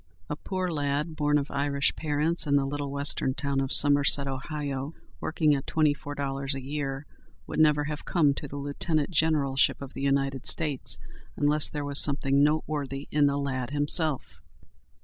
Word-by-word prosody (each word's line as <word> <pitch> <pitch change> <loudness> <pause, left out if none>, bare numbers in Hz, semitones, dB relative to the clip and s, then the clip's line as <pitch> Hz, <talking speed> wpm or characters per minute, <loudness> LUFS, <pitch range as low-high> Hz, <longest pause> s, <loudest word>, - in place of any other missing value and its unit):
A - - -1
poor 185 -2 -3
lad, 145 +1 -2
born 150 -1 +2
of 145 0 -3
Irish 140 0 0
parents 155 +2 -1
in 140 - +2
the 140 -1 +2
little 145 0 -4
western 140 -1 -1
town 140 -2 -1
of 135 -1 -2
Somerset, 145 -1 +5
Ohio, 140 +1 -4 0.2
working 155 -2 +1
at 135 -1 -3
twenty 155 -2 +2
four 145 0 -8
dollars 135 0 -2
a - - -4
year, 140 0 -4 0.4
would - - -4
never 150 -1 +4
have 150 0 -5
come 150 -5 +2
to 145 - -5
the 140 - -9
lieutenant 145 +3 -2
generalship 150 -5 +2
of 140 -2 -9
the - - -7
United 135 -1 0
States, 150 -5 +1 0.4
unless 150 +1 +2
there 145 -1 -4
was 140 0 +1
something 140 -1 +3
noteworthy 145 -2 -1
in 145 -1 +3
the 140 0 0
lad 130 -3 -3
himself. 145 0 0
145 Hz, 170 wpm, -27 LUFS, 140-150 Hz, 0.4 s, Somerset